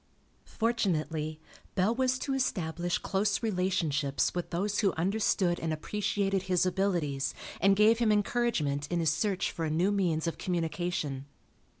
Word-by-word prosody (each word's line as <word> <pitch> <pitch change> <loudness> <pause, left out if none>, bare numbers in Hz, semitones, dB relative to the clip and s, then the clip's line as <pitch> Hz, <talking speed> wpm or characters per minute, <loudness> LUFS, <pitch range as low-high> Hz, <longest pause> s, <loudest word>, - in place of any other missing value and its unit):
Fortunately, 160 -9 -1 0.4
Bell 195 +4 +2
was 255 +1 +1
to 270 +1 -3
establish 175 -9 -1
close 200 +3 0
relationships 180 -9 0
with 175 -1 -3
those 200 +4 -1
who 200 -4 +2
understood 185 0 +1
and 160 - -2
appreciated 195 +3 -1
his 180 -1 +3
abilities 170 -8 0 0.3
and 195 0 +5
gave 215 +3 +5
him 230 -3 +3
encouragement 205 -10 0
in 175 - 0
his 160 -2 +2
search 195 +1 0
for 165 - -4
a 160 - 0
new 170 +6 +2
means 175 -6 +1
of 165 - -3
communication. 165 -5 -2
180 Hz, 140 wpm, -30 LUFS, 160-205 Hz, 0.4 s, and